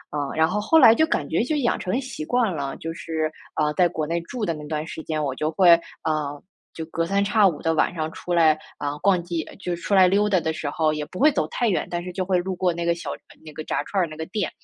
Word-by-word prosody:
嗯， 145 -2 -2
然 160 0 +4
后 205 +4 -1
后 320 +10 +4
来 225 -6 +8
就 315 - +4
感 145 - -1
觉 165 +9 +1
就 300 +4 -1
养 245 -5 +1
成 185 - -3
了 255 - +1
习 260 - -6
惯 225 0 +1
了， 140 -2 -3
就 165 0 -5
是， 160 -2 -3 0.3
呃， 150 -1 +1
在 180 +4 +3
国 155 -2 -3
内 170 +1 -1
住 220 +6 -4
的 170 - -1
那 150 -1 -8
段 155 0 -3
时 160 - -7
间， 155 -1 -2
我 140 -3 -2
就 155 +3 -1
会， 175 +2 +5 0.3
呃， 150 -2 -2 0.3
就 160 - -6
隔 165 +1 -2
三 195 +3 +1
差 205 +1 +3
五 170 -6 +1
的 165 - +1
晚 160 - +1
上 155 -2 -3
出 180 - -5
来， 160 -2 +4 0.2
啊， 145 0 -3
逛 185 -2 +3
街 170 -2 -3 0.2
就 180 -3 -3
出 175 +4 -4
来 190 -1 +7
溜 205 +3 +2
达 190 -3 +3
的 160 -1 -2
时 155 -2 -4
候 155 +1 +1
也 150 -1 -3
不 185 - -9
会 300 - +6
走 - - 0
太 240 - 0
远， 200 - 0
但 175 0 -2
是 180 +1 -7
就 185 - -2
会 185 0 +1
路 185 +1 -2
过 180 0 +1
那 170 0 -4
个 170 0 +2
小 170 -4 -7 0.3
那 155 - -10
个 155 - -7
炸 - - -1
串 195 - -1
儿 175 - +1
那 155 - -9
个 160 +1 -5
店。 205 -1 -2
170 Hz, 305 characters per minute, -23 LUFS, 155-195 Hz, 0.3 s, 来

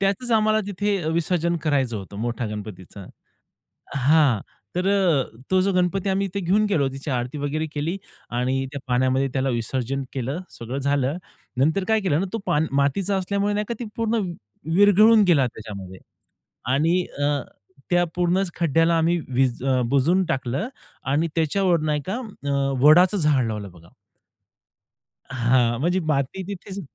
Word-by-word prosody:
त्याचच 200 +5 0
आम्हाला 215 0 +3
तिथे 205 +1 -1 0.2
विसर्जन 170 0 0
करायचं 135 -7 0
होतं 100 0 -8
मोठा 120 0 -2
गणपतीचा. 100 -2 -8 0.9
हां. 140 -4 +4 0.4
तर 180 +2 0
अ, 185 -9 +3 0.3
तो 185 - +4
जो 195 +1 +1
गणपती 180 +2 +1
आम्ही 195 +1 +1
इथे 195 +1 -4
घेऊन 200 +4 +2
गेलो 145 -8 +2
तिची 135 +3 -7
आरती 125 +3 -2
वगैरे 145 +2 -2
केली 160 +6 -2 0.3
आणि 130 +2 -1
त्या 140 - -5
पाण्यामध्ये 130 +2 +2
त्याला 135 0 0
विसर्जन 130 +3 -2
केलं, 135 +5 -3
सगळं 120 +4 -6
झालं. 140 +2 0 0.4
नंतर 160 +8 +2
काय 220 -1 +3
केलं 160 -5 +1
ना 195 - 0
तो - - 0
पाण 150 +2 +1
मातीचा 145 +9 +1
असल्यामुळे 200 +2 -1
नाही 210 0 -1
का - - 0
ती 240 - -4
पूर्ण 230 0 0 0.6
विरघळून 205 +3 +6
गेला 145 -7 +4
त्याच्यामध्ये. 100 -5 -9 0.7
आणि 165 +6 +2 0.2
अ, 145 -1 +1 0.5
त्या 175 0 +3
पूर्णच 180 +1 +1
खड्ड्याला 165 +1 +2
आम्ही 170 +2 +2 0.2
वीज 130 -1 +1 0.3
बुजवून 160 +8 +3
टाकलं 135 - -2 0.4
आणि 155 +4 +2
त्याच्यावर 170 +2 +2
नाही 150 -1 0
का? - - -1 0.3
अ, 140 - -1 0.3
वडाचं 175 +7 +6
झाड 145 -7 +2
लावलं 105 -3 -5
बघा. 85 -1 -18 1.4
हां. 120 -2 +2
म्हणजे 175 +4 +1
माती 155 +3 -1
तिथेच 195 0 -6
155 Hz, 150 wpm, -23 LUFS, 130-190 Hz, 1.4 s, विरघळून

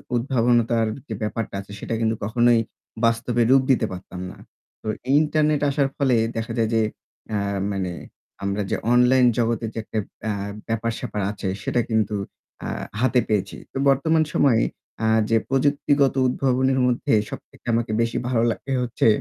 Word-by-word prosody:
উদ্ভাবনতার 120 -2 +2 0.2
যে 110 - -4
ব্যাপারটা 105 -1 -3
আছে 100 - -14
সেটা - - -4
কিন্তু 110 0 +1
কখনোই 120 +2 +3 0.5
বাস্তবে 115 +1 +1
রূপ 135 0 +6
দিতে 120 -3 +3
পারতাম 90 0 -8
না। - - -13 0.4
তো - - -9 0.3
ইন্টারনেট 155 -1 +2
আসার 140 -1 +1
ফলে 130 -4 +3 0.2
দেখা 115 +1 -3
যায় 110 -1 +2
যে 110 - +4 0.5
আ - - +2 0.3
মানে 95 -2 -2 0.5
আমরা 100 +1 -1
যে - - +2 0.2
অনলাইন 125 +1 +5
জগতের 115 -1 0
যে - - -10
একটা 110 - -3 0.3
আ - - +1 0.4
ব্যাপার-স্যাপার 115 -2 -2
আছে 100 -2 -5 0.2
সেটা 120 - +1
কিন্তু 110 -2 +1 0.5
আ - - -3 0.3
হাতে 130 -1 +3
পেয়েছি। 100 -2 0 0.2
তো - - -6
বর্তমান 160 +4 +3
সময়ে 120 -6 +4 0.4
আ - - +3 0.2
যে 115 - +4
প্রযুক্তিগত 140 0 +2
উদ্ভাবনের 130 +1 +1
মধ্যে 120 -2 0 0.2
সবথেকে - - -11
আমাকে 115 -1 0
বেশি 115 0 0
ভালো 120 -2 +1
লাগে 135 +4 -4
হচ্ছে 120 -1 +1
120 Hz, 155 wpm, -23 LUFS, 110-130 Hz, 0.5 s, রূপ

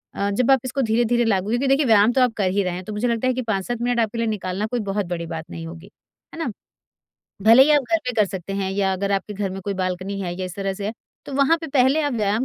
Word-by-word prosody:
अ, 200 - -1
जब 245 +6 +2
आप 265 - +5
इसको 260 +2 -2
धीरे-धीरे 235 0 +2
लागू 200 -2 +1
क्योंकि 245 +4 0
देखिए 275 +2 +3
व्यायाम 220 -1 +5
तो 260 - +3
आप 250 -2 +3
कर 195 -3 +1
ही 200 +1 +1
रहे 180 -1 -2
हैं 180 +1 -5
तो 215 - -6
मुझे 210 +4 -1
लगता 235 +1 0
है 255 - +2
कि 255 - -2
5-7 220 0 -2
मिनट 245 0 0
आपके 225 0 0
लिए 230 0 0
निकालना 200 -2 -2
कोई 245 - 0
बहुत 200 0 -1
बड़ी 170 -1 -4
बात 160 -1 -6
नहीं 165 0 -7
होगी। 170 +3 -11 0.4
है - - -9
ना? 325 - -1 0.9
भले 230 +5 +8
ही 300 - +4
आप 295 -2 +5
घर 330 - +5
पे 250 - 0
कर 215 -2 +4
सकते 190 0 -6
हैं 195 -1 -2
या 195 -1 +1
अगर 200 +1 -1
आपके 195 +2 -2
घर 200 -1 -2
में 190 +1 -6
कोई 200 +1 -3
बालकनी 185 +1 -3
है 175 -2 -3
या 185 +1 -4
इस 180 -1 -6
तरह 195 -1 -2
से 200 +1 -5
है। 215 - -2 0.3
तो - - -7
वहाँ 280 +4 +4
पे 325 - -5
पहले 270 +2 +3
आप 290 -2 0
व्यायाम 215 +1 0
210 Hz, 290 wpm, -22 LUFS, 190-245 Hz, 0.9 s, भले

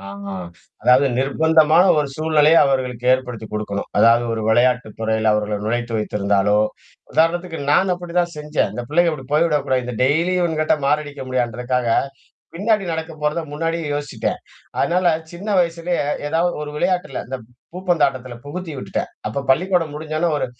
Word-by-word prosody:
ஆ 100 - -12 0.8
அதாவுது 130 +3 +5
நிர்பந்தமான 160 +4 +4
ஒரு 150 -1 +2
சூழ்நிலைய 155 +1 +3
அவர்களுக்கு 125 -3 -1
ஏற்படுத்திக் 125 -4 -3
கொடுக்கணும். 105 -1 -3
அதாது 115 +3 +5
ஒரு 115 - -2
விளையாட்டுத் 120 -1 +2
துறையில 110 0 +1
அவர்கள 105 0 0
நுழைத்து 120 +1 -2
வைத்திருந்தாலோ, 105 -1 +1 0.6
உதாரணத்துக்கு 165 +1 +1
நான் 190 +5 +3
அப்டிதான் 175 -1 -2
செஞ்சேன். 150 0 -1
இந்த 120 - -4
பிள்ளைகள் 170 +2 +3
இப்படி 135 -3 -10
போய்விடக்கூடாது. 145 -5 +2
இந்த 125 0 -5
டெய்லியும் 165 +7 +2
இவன்கிட்ட 155 -2 +1
மாரடிக்க 145 -1 -1
முடியாதுன்றதுக்காக, 125 0 -1 0.7
பின்னாடி 205 +3 +1
நடக்கப் 160 -1 -5
போறத 150 +3 0
முன்னாடியே 165 +2 -2
யோசிச்சுட்டேன். 145 -1 -3 0.4
அதனால 180 +1 +1 0.3
சின்ன 185 +5 -8
வயசுலேயே 170 0 0 0.3
ஏதாவது 165 +3 +1
ஒரு 150 - -5
விளையாட்டில 175 -4 -1
இந்த 130 +1 -4 0.4
பூப்பந்தாட்டத்தில 140 -9 0
புகுத்தியுட்டுட்டேன். 160 -3 -5 0.2
அப்போ 110 +6 -2
பள்ளிக்கூடம் 170 +1 +2
முடிஞ்ச 155 +1 -6
உடனே 170 +1 +1
ஒரு - - -1
150 Hz, 135 wpm, -20 LUFS, 125-170 Hz, 0.8 s, அதாவுது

